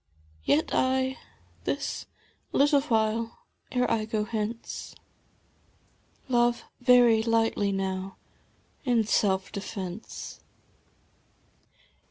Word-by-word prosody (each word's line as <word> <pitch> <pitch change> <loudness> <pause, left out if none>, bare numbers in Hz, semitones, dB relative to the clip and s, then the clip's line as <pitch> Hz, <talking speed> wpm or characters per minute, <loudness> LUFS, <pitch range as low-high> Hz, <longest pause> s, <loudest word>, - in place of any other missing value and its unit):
Yet 145 - +2
I, 260 0 +1 0.5
this - - -2 0.5
little 285 0 +5
while 225 -3 0 0.3
ere 250 0 +1
I 215 -1 +1
go 215 -1 -1
hence, 220 +1 -4 1.3
Love 240 -1 +2 0.2
veiy 240 -3 +6
lightly 225 -3 +2
now, 190 0 -3 0.7
in 240 -4 +3
self 190 -3 +1
defence. 195 0 -6
225 Hz, 80 wpm, -28 LUFS, 205-245 Hz, 1.3 s, veiy